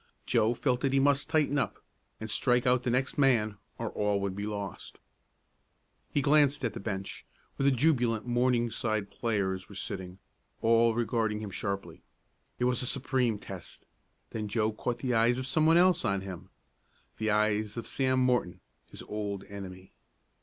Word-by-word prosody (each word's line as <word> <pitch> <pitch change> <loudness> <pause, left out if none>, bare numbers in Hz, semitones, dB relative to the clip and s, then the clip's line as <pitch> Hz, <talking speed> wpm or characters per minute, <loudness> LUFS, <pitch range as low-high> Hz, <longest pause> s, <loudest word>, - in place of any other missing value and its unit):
Joe 115 +3 +2
felt 125 -1 0
that 135 -1 +1
he 135 - +4
must 140 0 +2
tighten 145 -2 +2
up, - - -2 0.4
and 110 - -5
strike 125 +2 +2
out 125 0 +4
the 125 - -2
next 130 +4 0
man, 115 -7 +3 0.2
or - - -3
all 105 -1 0
would 100 -1 -2
be 100 +1 -4
lost. 100 -3 -6 1.1
He 145 - +1
glanced 145 -2 +4
at 115 - -1
the - - -6
bench, 95 -1 -5 0.3
where 140 0 +3
the 135 - +1
jubilant 120 -5 +2
Morningside 120 -4 0
players 95 -5 -2
were 100 - -11
sitting, 95 -2 -6 0.4
all 115 0 +4
regarding 115 -2 0
him 105 -2 -6
sharply. 95 -4 -4 0.6
It - - -2
was 125 -1 +2
a 125 - -2
supreme 125 -4 +1
test. 95 -3 -10 0.5
Then 110 -1 -3
Joe 110 +1 0
caught 120 +2 -3
the 125 0 -2
eyes 115 +2 +3
of 130 - -3
some 155 +4 +2
one 165 +1 +6
else 180 0 +4
on 100 -1 0
him. 95 -1 -8 0.7
The 110 0 0
eyes 105 0 +1
of 115 - -4
Sam 130 -1 +1
Morton, 125 -8 +1 0.3
his - - -10
old 100 -2 -4
enemy. 95 -2 -9
115 Hz, 170 wpm, -30 LUFS, 100-130 Hz, 1.1 s, one